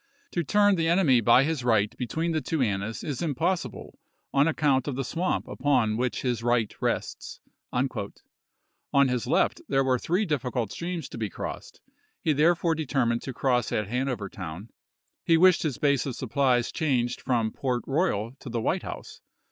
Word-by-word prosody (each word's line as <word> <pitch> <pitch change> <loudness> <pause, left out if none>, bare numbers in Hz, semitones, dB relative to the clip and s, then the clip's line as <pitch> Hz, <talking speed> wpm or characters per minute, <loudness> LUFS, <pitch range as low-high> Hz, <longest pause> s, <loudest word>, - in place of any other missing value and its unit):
To 175 - -1
tui 210 +7 +2
n 205 0 +6
the 165 -1 +1
enemy 165 -8 +4
by 120 +4 +6
his 155 -3 -1
right 110 -4 +2
between 160 +7 -2
the 160 -1 0
two 155 +4 -2
Annas 105 -2 -1
is 140 -5 -4
im 155 -5 -1
possible 165 - -2 0.3
on 140 +2 +4
account 145 -5 +1
of 140 - -2
the 135 - -2
swamp 170 +8 -2
upon 120 -7 +1
which 125 +2 -2
his 125 -3 -1
right 120 -2 +1
rests." - - -3 0.3
On 125 +2 +1 1.2
his 125 -2 -1
left - - +2
there 135 0 +3
were 130 -1 +1
three 180 - 0
difficult 125 - -2
streams 170 -1 -4
to 115 - -8
be 110 -2 -2
crossed; - - -7 0.4
he 155 - +3
therefore 165 +3 +3
determined 135 -7 0
to 135 - -5
cross 125 -3 +1
at 105 -2 -1
Hanover 125 -3 -2
Town; 90 +4 -8 0.5
he 165 - +4
wished 185 +1 +5
his 150 -7 -2
base 140 -2 +1
of 130 - -3
supplies 130 -1 +1
changed 125 -6 0
from 115 -4 0
Port 125 -4 -2
Royal 135 - 0
to - - -9
the 120 0 -2
White - - 0
House. - - -8
130 Hz, 180 wpm, -27 LUFS, 120-160 Hz, 1.2 s, n